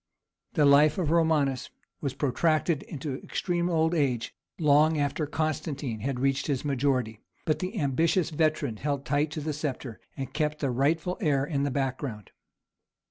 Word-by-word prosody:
The 150 -5 +3
life 145 +2 +6
of 165 -5 0
Romanus 155 -6 +2 0.3
was 140 -4 -2
protracted 155 +2 +1
into 140 -3 -5
extreme 175 -1 -1
old 160 -1 +2
age, 130 -8 0 0.2
long 155 0 +4
after 145 +1 -1
Constantine 145 -6 -2
had 130 +3 -2
reached 135 +1 +1
his 140 -2 -1
majority; 130 -5 0 0.3
but 155 - +1
the 190 +4 -3
ambitious 160 +5 +1
veteran 155 -6 0
held 140 +2 -2
tight 145 +3 +1
to 150 +1 -5
the 155 +1 -2
sceptre, 135 -5 -4 0.2
and 135 -1 -5
kept 150 0 0
the 140 -4 -1
rightful 160 +8 0
heir 140 -6 +2
in 145 -2 -1
the 140 - +1
background. 130 -5 -3
145 Hz, 155 wpm, -28 LUFS, 135-155 Hz, 0.3 s, life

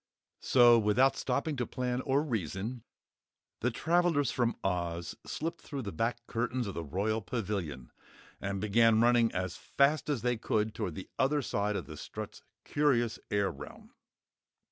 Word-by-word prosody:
So, 120 -2 +6
without 115 +6 +3
stopping 150 +2 -1
to 125 - -1
plan 125 0 -2
or 140 +2 +1
reason, 110 - -3 0.8
the 125 - +1
travellers 160 +1 +2
from 120 -2 +1
Oz 85 -2 -2
slipped 165 +2 -4
through 140 -3 -5
the 100 - -4
back 115 +6 -2
curtains 120 +1 -1
of 100 - -4
the 85 - -4
Royal 100 +8 -1
Pavilion 95 - -4 0.5
and 100 0 -2
began 110 +2 +4
running 120 -1 +4
as 90 -1 -3
fast 140 0 +1
as 140 -6 -1
they 120 -1 +1
could 110 -1 0
toward 85 -6 -3
the 95 - -8
other 140 +2 +2
side 105 -1 -1
of - - -3
Strut's - - -7 0.2
curious 120 -6 +1
air 100 -2 +1
realm. 75 +1 -11
115 Hz, 150 wpm, -31 LUFS, 100-130 Hz, 0.8 s, So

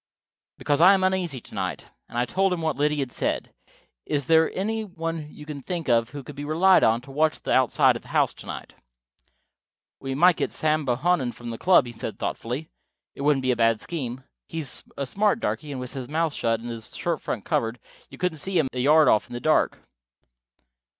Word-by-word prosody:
"Because 145 +1 0
I 190 +3 +8
am 190 - 0
uneasy 185 -7 0
to - - -16
night." - - -4 0.2
And - - -7
I 120 - +2
told 190 +9 +1
him 180 -2 -1
what 160 - 0
Liddy 150 +1 +1
had 130 -3 -3
said. - - -2 0.5
"Is 145 -2 -1
there 160 +1 +4
any 220 +3 -1
one 165 -5 -5
you 150 - -12
can 150 -2 -7
think 170 0 -4
of 115 -1 +3
who 140 +1 -8
could 145 - -10
be 145 - -6
relied 170 +6 +4
on 115 +2 +3
to 135 +2 -13
watch 155 +2 +1
the - - -4
outside 130 -2 +4
of - - -6
the - - -18
house - - +2
to - - -13
night?" - - -7 1.3
"We 135 -1 -4
might 175 +3 +5
get - - 0
Sam 155 -1 0
Bohannon 130 0 +1
from 120 -1 -7
the 115 - -7
club," 180 -6 +5
he 120 - -7
said 115 -1 -6
thoughtfully. 125 +7 -4 0.4
"It - - -9
wouldn't 140 -2 +2
be 130 - +2
a - - +1
bad 115 -1 +3
scheme. 130 -6 -5 0.3
He's 160 -5 -3
a 140 - -2
smart 210 - +1
darky, 155 -8 -3
and 135 - -4
with 125 -1 -7
his 130 -2 -6
mouth 160 0 0
shut 115 -4 0
and 120 +1 -6
his 115 -1 -6
shirt - - -1
front - - -4
covered, 115 +1 0 0.3
you - - -12
couldn't 180 -4 -1
see 190 +5 -1
him 150 -5 +2
a 125 - -3
yard 150 +4 +5
off 110 - +3
in - - -11
the 120 - -3
dark." 155 +5 +1
145 Hz, 220 wpm, -25 LUFS, 125-165 Hz, 1.3 s, I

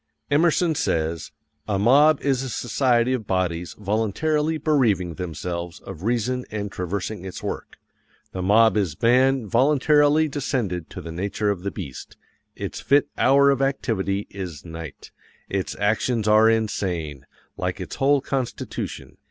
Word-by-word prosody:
_ - - -54 0.3
Emerson 165 +1 +3
says: 80 - -1 0.4
"A 100 -2 0
mob 140 +8 +5
is 135 -2 +1
a 135 - -4
society 120 +1 +1
of 115 -5 -3
bodies 90 -2 -1
voluntarily 130 +10 0
bereaving 120 - +1
themselves 85 0 -5
of 95 -4 -9
reason 120 +4 0
and 105 -2 -4
traversing 95 +2 -4
its 95 -1 -7
work. - - -5 0.5
The 95 - -4
mob 110 +3 +4
is 90 -7 -1
man 130 +1 +3
voluntarily 145 +5 +3
descended 125 - -2
to - - -8
the 85 - -7
nature 100 +4 -1
of 95 -3 -4
the 100 - -2
beast. 70 -8 -8 0.4
Its - - -5
fit 140 +1 +3
hour 140 +1 +5
of 135 -1 0
activity 105 -7 -1
is 90 -7 -7
NIGHT. 80 -3 -9 0.4
ITS 95 -1 -2
ACTIONS 110 +2 +1
ARE 110 +1 +6
INSANE, 90 -10 -2 0.3
_like 90 +1 -2
its 90 - -6
whole 140 +1 +3
constitution. 130 -2 -4
110 Hz, 145 wpm, -23 LUFS, 90-135 Hz, 0.5 s, ARE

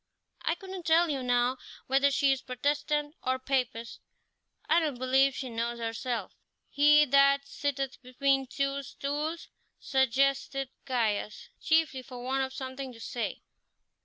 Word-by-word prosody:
I 330 - +1
couldn't 375 -1 -8
tell 330 0 +4
you, 275 -2 -2
now, 245 +1 +1 0.3
whether 275 +2 +3
she 280 0 +3
is 270 -1 0
Protestant 290 +3 -1
or 260 0 0
Papist; 250 -3 -2 0.7
I 330 - +5
don't 300 -6 -1
believe 265 +2 +3
she 265 - -4
knows 235 0 -3
herself." 230 -2 -3 0.4
"He 300 +1 +6
that 275 0 +4
sitteth 275 -2 -3
between 270 +1 +1
two 275 +1 -1
stools 295 +5 -4
" - - -46
suggested 270 +1 +1 0.2
Caius, 220 -5 -1
chiefly 315 -4 +2
for 255 -1 -10
want 265 +1 0
of 265 - -4
something 260 0 -6
to 230 - -14
say. 235 +1 -4
270 Hz, 140 wpm, -29 LUFS, 255-285 Hz, 0.7 s, He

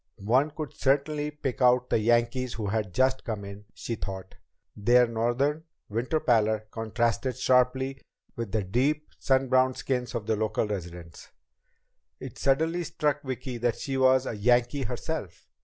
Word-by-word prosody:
One 130 +8 +3
could 155 -1 -6
certainly 145 +2 +1
pick 145 -4 -5
out 125 0 +4
the - - +3
"Yankees" 120 +2 +1
who 110 - -4
had 105 -1 -1
just 130 +5 +1
come 105 -4 -4
in, 100 +1 -10
she 120 - -4
thought. 95 -3 -6 0.4
Their 120 +4 +4
northern 120 +7 0 0.2
winter 120 +9 -1
pallor 110 -4 +2
contrasted 115 +3 -1
sharply 130 +1 +2 0.3
with 115 -4 -5
the 105 0 0
deep 135 +10 0
sun 135 -1 +2
browned 130 0 +3
skins 125 -2 -2
of 115 -3 -3
the 110 0 +1
local 110 +1 0
residents. 85 -4 -7 0.9
It - - -9
suddenly 160 +6 +1
struck 150 -2 -1
Vicki 130 -2 -5
that 120 -1 0
she 135 - -4
was 130 0 +4
a - - -3
"Yankee" 120 +5 +2
herself. 125 - -5
125 Hz, 155 wpm, -27 LUFS, 110-135 Hz, 0.9 s, out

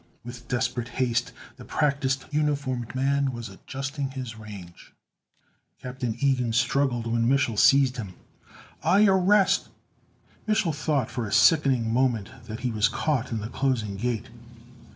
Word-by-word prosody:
With 120 0 -9
desperate 125 -1 -1
haste 120 -2 0 0.3
the - - -11
practiced, 140 -2 0
uniformed 140 -5 -1
man 140 +1 +1
was 120 -3 -7
adjusting 135 +7 -5
his 130 -4 -6
range. 100 -6 -11 0.9
Captain 125 -3 -4
Ilgen 125 -3 +1
struggled 130 -1 +1
when 115 0 +1
Mich'l 135 -4 +2
seized 135 +3 +4
him. 100 -6 -6 0.7
"I 205 +3 +5
arrest 195 +1 +3 0.4
" - - -34
Mich'l 215 -6 +1
thought 145 -4 -1
for 120 -4 -3
a - - -7
sickening 130 - +4
moment 120 -5 +1 0.2
that 110 +1 -6
he 125 -1 -1
was 110 +1 +2
caught 130 0 -1
in 110 -2 -2
the 110 - -5
closing 120 -7 -1
gate. 120 +2 -3
125 Hz, 140 wpm, -26 LUFS, 115-140 Hz, 0.9 s, I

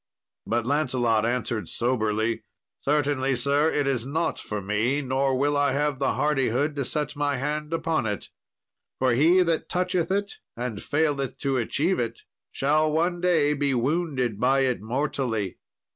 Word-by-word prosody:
But 115 0 0
Lancelot 125 -5 +1
answered 120 -5 -2
soberly, 110 -2 0 0.4
"Certainly, 140 -2 +1
sir, 140 +5 +2
it 145 -2 0
is 130 -4 0
not 155 +6 -1
for 105 - -4
me; 110 +9 0
nor 130 0 +1
will 145 +2 +1
I 145 -1 +2
have 145 -1 0
the 135 - +1
hardihood 145 0 +1
to 140 - -1
set 150 +2 -2
my 145 -1 0
hand 150 +3 -3
upon 165 -6 0
it. 105 -3 -4 0.7
For 130 -1 +2
he 165 +9 +5
that 165 -2 -1
toucheth 180 -1 0
it 200 +1 -1 0.2
and 120 -4 -4
faileth 145 -3 0
to 135 -2 0
achieve 150 - 0
it 115 -1 -3 0.3
shall 155 +3 +2
one 170 +3 0
day 160 -5 +3
be 140 -2 0
wounded 130 - 0
by 135 +3 +3
it 130 -4 0
mortally. 115 -4 -2
140 Hz, 155 wpm, -25 LUFS, 120-150 Hz, 0.7 s, he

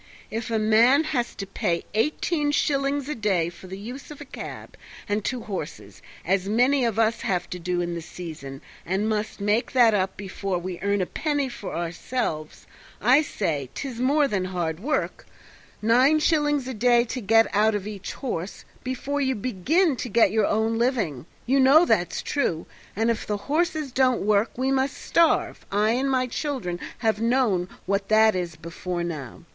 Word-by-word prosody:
If 225 +2 -4
a 225 - +1
man 225 +7 +5
has 260 -7 -2
to 195 - -5
pay 170 -3 -2
eighteen 295 - 0
shillings 280 -1 0
a 300 - -2
day 195 - 0
for 175 +2 -13
the 190 +1 -7
use 245 +7 -8
of 300 - -10
a - - -8
cab - - -9 0.3
and 205 0 -1
two 250 +2 -2
horses, 190 -8 -7 0.2
as 190 +2 +1
many 250 +5 +3
of 230 -3 0
us 225 0 +2
have 185 -6 -1
to 180 - -4
do 175 +1 -1
in 175 0 -2
the 170 - -4
season, 155 -6 -8 0.2
and 195 +4 -1
must 215 0 -2
make 210 +6 0
that 240 -4 +6
up 190 -2 0
before 195 -1 -3
we 175 0 -5
earn 200 0 0
a - - +1
penny 290 - -1
for 235 -4 -7
ourselves 170 -1 -3 0.3
I 255 +7 +5
say 155 - -2
'tis 255 -4 -5
more 285 +3 +3
than 195 -7 -1
hard 175 -3 -3
work; 285 +9 -2 0.6
nine 255 +7 +5
shillings 295 -4 +1
a 260 - -3
day 240 +1 +4
to 250 +1 -5
get 225 +2 +5
out 215 +1 +3
of 205 -2 -3
each 210 -3 -6
horse 185 -8 -5 0.2
before 265 +3 -2
you 265 -1 +1
begin 260 - +1
to 245 - -4
get 225 -2 +4
your 215 -1 +2
own 220 +1 +1
living. 205 - -1 0.2
You 270 +3 +3
know 280 +6 +7
that's 185 - 0
true, 170 - -1 0.3
and 225 +3 +2
if 230 - -4
the 210 - -1
horses 305 - -1
don't 255 -1 +2
work 210 +1 +3
we 260 +1 0
must 270 0 0
starve, 330 -2 +2
and 200 - 0
I 215 +1 +3
and 260 +3 0
my 260 -1 +2
children 250 - -3 0.3
have 220 -1 +2
known 230 -7 +1 0.2
what 195 +1 -1
that 220 -1 +5
is 175 -3 -3
before 170 +2 -5
now. 150 -8 -6
220 Hz, 185 wpm, -25 LUFS, 185-260 Hz, 0.6 s, know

